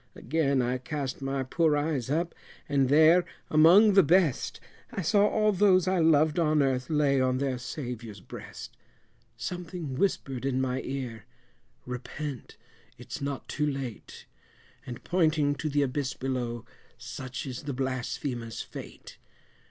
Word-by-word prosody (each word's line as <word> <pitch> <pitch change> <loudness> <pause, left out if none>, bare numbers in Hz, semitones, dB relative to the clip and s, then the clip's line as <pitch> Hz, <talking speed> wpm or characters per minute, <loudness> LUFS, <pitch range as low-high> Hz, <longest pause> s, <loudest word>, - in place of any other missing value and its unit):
Again 140 -2 +1
I 125 +1 -1
cast 140 -1 -4
my 135 0 -1
poor 155 +3 +2
eyes 145 -5 -1
up, 165 +4 0 0.3
and 140 -3 +2
there 160 +5 +6 0.3
among 180 +8 +7
the 195 - +8
best, 170 -3 +2 0.3
I 195 - -3
saw 205 +5 +4
all 215 0 +2
those 185 -2 +4
I 185 -1 +2
loved 160 0 +4
on 155 -3 +3
earth 130 -2 -1
lay 145 -3 +2
on 130 0 +2
their 130 -2 -1
Saviour's 120 -5 -6
breast; - - -10 0.6
Something 175 -5 -5
whispered 135 -5 -1
in 135 -1 0
my 130 0 -1
ear 125 -5 -5 0.6
repent 125 +2 -6 0.4
it's 125 +4 -8
not 140 -1 -4
too 150 0 -1
late, 135 -6 -6 0.6
And 120 -2 -7
pointing 155 -5 +2
to 155 +2 -3
the 145 0 +2
abyss 135 0 -2
below 120 -3 -3 0.3
such 130 +1 -6
is 130 -3 -5
the 145 - -3
blasphemer's 125 -2 -3
fate. - - -9
140 Hz, 140 wpm, -28 LUFS, 130-160 Hz, 0.6 s, the